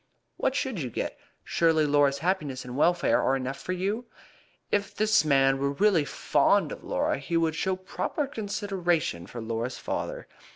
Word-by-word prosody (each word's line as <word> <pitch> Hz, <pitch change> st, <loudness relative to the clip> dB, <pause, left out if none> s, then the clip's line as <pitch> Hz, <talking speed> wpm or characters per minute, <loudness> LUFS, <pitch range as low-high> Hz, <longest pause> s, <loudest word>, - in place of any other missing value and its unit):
"What 265 Hz, -, 0 dB
should 260 Hz, -9 st, -1 dB
you 130 Hz, -, -3 dB
get? -, -, -3 dB, 0.3 s
Surely 160 Hz, -2 st, +2 dB
Laura's 145 Hz, -1 st, +3 dB
happiness 150 Hz, -6 st, -2 dB
and 125 Hz, 0 st, -7 dB
welfare 175 Hz, +4 st, +3 dB
are 135 Hz, -, +2 dB
enough 135 Hz, +1 st, -3 dB
for -, -, -4 dB
you?" 200 Hz, +6 st, -2 dB, 0.7 s
"If 200 Hz, -1 st, 0 dB
this 215 Hz, -2 st, +3 dB
man 135 Hz, -2 st, +3 dB
were 140 Hz, +1 st, 0 dB
really 180 Hz, -2 st, +3 dB
fond -, -, +2 dB
of -, -, -8 dB
Laura -, -, 0 dB
he 165 Hz, +5 st, -1 dB
would 165 Hz, -1 st, +1 dB
show 190 Hz, +4 st, 0 dB
proper 185 Hz, -, -3 dB
consideration 195 Hz, -, -2 dB
for 120 Hz, -, -7 dB
Laura's 115 Hz, +2 st, -3 dB
father. -, -, -4 dB
165 Hz, 165 wpm, -27 LUFS, 135-195 Hz, 0.7 s, Laura's